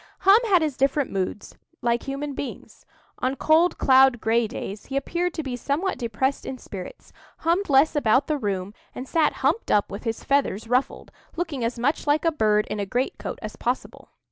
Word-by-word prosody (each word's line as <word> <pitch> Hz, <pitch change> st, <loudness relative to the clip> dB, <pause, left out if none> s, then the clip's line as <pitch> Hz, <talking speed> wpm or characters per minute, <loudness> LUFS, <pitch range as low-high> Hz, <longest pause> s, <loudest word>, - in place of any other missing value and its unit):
Hum 395 Hz, +3 st, +7 dB
had 365 Hz, -5 st, +4 dB
his 300 Hz, -4 st, -2 dB
different 275 Hz, +1 st, +1 dB
moods, 195 Hz, +1 st, -3 dB, 0.3 s
like 235 Hz, 0 st, +1 dB
human 280 Hz, +1 st, -3 dB
beings. 275 Hz, -, -8 dB, 0.3 s
On 255 Hz, +2 st, 0 dB
cold, 320 Hz, +5 st, +3 dB
cloudy, 265 Hz, -1 st, +5 dB
gray 225 Hz, +1 st, +1 dB
days 205 Hz, 0 st, -7 dB
he 270 Hz, -, -2 dB
appeared 345 Hz, +5 st, -2 dB
to 320 Hz, -, -3 dB
be 260 Hz, -3 st, -4 dB
somewhat 290 Hz, +9 st, -2 dB
depressed 250 Hz, +3 st, -1 dB
in 265 Hz, -, -6 dB
spirits, 190 Hz, -6 st, -10 dB, 0.2 s
hummed 345 Hz, +4 st, 0 dB
less 280 Hz, +3 st, +4 dB
about 260 Hz, -1 st, +3 dB
the 300 Hz, -1 st, -1 dB
room, 195 Hz, -3 st, -3 dB, 0.2 s
and 255 Hz, -, -6 dB
sat 320 Hz, +2 st, +2 dB
humped 460 Hz, -, +1 dB
up 205 Hz, -1 st, +2 dB
with 200 Hz, -, -6 dB
his 225 Hz, -2 st, -3 dB
feathers 260 Hz, -6 st, 0 dB
ruffled, 250 Hz, +3 st, -1 dB, 0.2 s
looking 320 Hz, -7 st, -3 dB
as 235 Hz, +1 st, -2 dB
much 280 Hz, +6 st, -1 dB
like 300 Hz, +3 st, +2 dB
a 330 Hz, -, +4 dB
bird 210 Hz, -7 st, +2 dB
in 210 Hz, -, -2 dB
a 200 Hz, -, -1 dB
great 250 Hz, +6 st, -2 dB
coat -, -, -5 dB
as 215 Hz, -, -6 dB
possible. 245 Hz, +2 st, -4 dB
265 Hz, 195 wpm, -24 LUFS, 225-300 Hz, 0.3 s, Hum